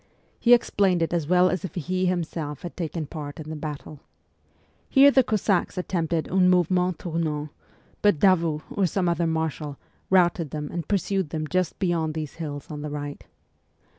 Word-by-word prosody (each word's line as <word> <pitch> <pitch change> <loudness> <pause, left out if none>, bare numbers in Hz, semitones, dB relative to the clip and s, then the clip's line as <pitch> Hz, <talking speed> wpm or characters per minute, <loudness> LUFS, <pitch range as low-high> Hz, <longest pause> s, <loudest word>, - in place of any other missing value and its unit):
He 245 0 +7
explained 190 -7 +1
it 165 - -2
as 165 -4 0
well 180 +1 +5
as 185 - -2
if 190 - -6
he 185 +2 -1
himself 165 -4 -3
had 175 - -7
taken 165 -2 -3
part 145 +1 -7
in 155 0 -7
the - - -4
battle. 150 -1 -7 0.9
Here 280 +1 +7
the 265 -1 +5
Cossacks 200 -4 0
attempted 170 -3 -1
un 180 0 +4
mouvement 180 0 +2
tournant, 155 -3 -3 0.5
but 205 -5 +4
Davout, 165 -3 +3
or 195 -2 +1
some 180 +1 0
other 170 0 +1
marshal, 160 -3 -2 0.3
routed 175 -4 +3
them 150 +1 -5
and 170 -1 -4
pursued 195 -3 0
them 155 -1 -3
just 185 +2 -1
beyond 165 -4 0
these 155 -2 -5
hills 145 -2 -6
on 150 -1 -5
the 150 - -4
right. 145 -1 -6
170 Hz, 170 wpm, -25 LUFS, 155-185 Hz, 0.9 s, He